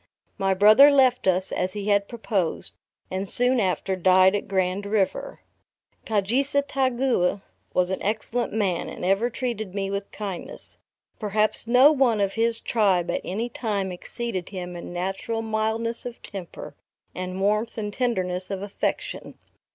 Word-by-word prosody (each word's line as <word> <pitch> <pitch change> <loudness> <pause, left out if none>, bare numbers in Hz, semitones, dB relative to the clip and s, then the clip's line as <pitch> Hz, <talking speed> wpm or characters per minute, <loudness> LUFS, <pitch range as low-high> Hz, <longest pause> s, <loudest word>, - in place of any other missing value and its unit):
My 195 0 +2
brother 215 +9 +8
left 260 -5 +3
us, 185 +1 +2
as 185 0 -1
he 205 0 -3
had 200 -1 +3
proposed, 210 -7 -2 0.4
and 190 +1 -2
soon 250 +1 +3
after 190 -1 0
died 185 +1 +5
at 205 - -3
Grand 190 +1 -1
River. 200 -2 -1 0.7
Kaujisestaugeau, 255 -2 +1 0.3
was 180 0 +2
an 190 - -2
excellent 220 +3 -1
man, 195 -6 -1
and - - -6
ever 195 +6 +2
treated 220 -6 -4
me 195 -1 -2
with 200 0 -4
kindness. 200 -4 -5 0.4
Perhaps 215 +1 0
no 255 +5 +7
one 260 -7 +2
of 195 -1 +1
his 230 0 +1
tribe 195 -6 +1
at - - -2
any 220 +6 -3
time 205 -5 -2
exceeded 185 +1 -5
him 180 -2 -6
in 170 - -7
natural 195 +6 -3
mildness 220 +1 -1
of 240 - -9
temper, 190 -4 -8 0.4
and 185 +1 -5
warmth 210 +4 0
and 210 -2 -3
tenderness 185 -7 -1
of 195 -1 -4
affection. 205 - -4
205 Hz, 145 wpm, -25 LUFS, 190-230 Hz, 0.7 s, brother